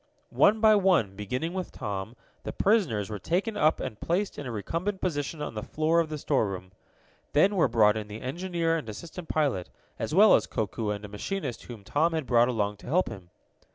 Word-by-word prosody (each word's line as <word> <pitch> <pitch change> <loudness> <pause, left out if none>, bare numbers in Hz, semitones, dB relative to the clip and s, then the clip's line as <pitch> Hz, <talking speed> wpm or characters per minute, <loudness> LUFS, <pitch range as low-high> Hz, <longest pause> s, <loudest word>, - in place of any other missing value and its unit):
One 215 +1 +4
by 220 -1 +7
one, 185 - +3
beginning 125 - -3
with 185 -2 -4
Tom, 100 +3 -5 0.3
the - - -5
prisoners 165 - +1
were 105 - -4
taken 190 - -1
up 155 -5 +3
and 115 -5 -5
placed 185 +2 -1
in 145 - -5
a - - -4
recumbent 170 - -3
position 150 -3 -2
on - - -5
the 105 - -4
floor 155 +6 +1
of 165 -2 0
the 155 - -4
storeroom. 100 -11 -1 0.6
Then 190 +7 +4
were 170 -7 +4
brought 110 -3 +4
in 110 -1 -4
the 105 +1 -7
engineer 170 +3 -1
and 125 -9 -6
assistant 165 - -8
pilot, 140 - 0 0.3
as 155 - -2
well 210 +2 +7
as - - +3
Koku 110 -1 -2
and 105 0 -3
a - - -7
machinist 125 - -5
whom 115 -5 -10
Tom 160 +10 +1
had 160 -3 -1
brought 120 -1 +4
along 105 -4 -1
to - - -14
help 175 +8 +2
him. 95 -6 -10
145 Hz, 205 wpm, -28 LUFS, 105-175 Hz, 0.6 s, by